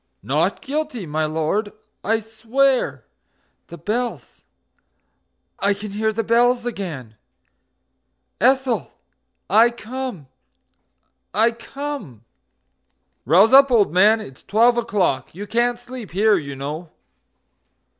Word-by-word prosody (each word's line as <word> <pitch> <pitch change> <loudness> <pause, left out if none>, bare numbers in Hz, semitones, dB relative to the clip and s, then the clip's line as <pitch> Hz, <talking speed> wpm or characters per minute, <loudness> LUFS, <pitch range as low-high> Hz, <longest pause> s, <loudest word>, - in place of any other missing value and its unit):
NOT 150 - 0
GUILTY, 290 - -3
my 155 0 -1
Lord, 160 +7 -1 0.3
I 225 +2 +1
swear... 235 +5 0 0.6
The 170 - -10
bells 240 +6 -4 1.2
I 200 0 +1
can 205 0 -7
hear 220 +2 0
the 225 +1 -2
bells 240 +2 +2
again!... 155 - -6 1.2
Ethel, 260 -1 +1 0.5
I 225 +3 +5
come, 240 - -6 1.1
I 225 +2 +4
come!... 230 - -7 1.0
"Rouse 190 - +5
up, 275 0 +8
old 215 - +3
man, 210 +5 +5
it's 135 -12 -11
twelve 235 +4 +3
o'clock. 195 - -1
You 200 +3 -6
can't 235 +3 0
sleep 245 -4 -9
here, 210 +4 +3
you 140 -6 -4
know. 150 +5 -6
220 Hz, 105 wpm, -21 LUFS, 175-240 Hz, 1.2 s, up